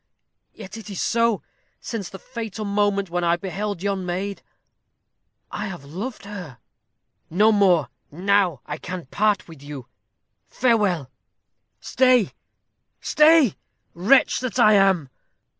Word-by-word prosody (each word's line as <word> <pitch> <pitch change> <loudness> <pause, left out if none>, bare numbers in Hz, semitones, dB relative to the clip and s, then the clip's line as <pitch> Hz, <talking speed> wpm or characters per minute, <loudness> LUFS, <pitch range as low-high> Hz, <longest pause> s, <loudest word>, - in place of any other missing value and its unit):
Yet 195 -3 -11
so 225 - -6
it 220 - -11
is. 230 +2 0 0.4
Since 205 -6 -5
the 190 - -9
fatal 225 -1 -6
moment 200 -2 0
when 175 0 -1
I 170 0 +3
beheld 195 +1 -4
yon 200 -2 -1
maid, 190 +3 -4 1.1
I - - -4
have 175 -7 -8
loved 200 - -6
her." 180 -11 -8 0.7
"No 210 +7 +4
more. 185 - +3 0.2
Now 185 -3 +1
I - - -6
can 180 -3 -6
part 205 +8 0
with 160 -5 -13
you. 145 -3 -8 0.6
Farewell!" 200 - +1 0.7
"Stay, 255 -6 +3 0.7
stay! 305 - +5 0.4
wretch 205 +11 +3
that 255 -1 -4
I 215 -3 +6
am. 190 -8 +3
200 Hz, 125 wpm, -23 LUFS, 175-215 Hz, 1.1 s, I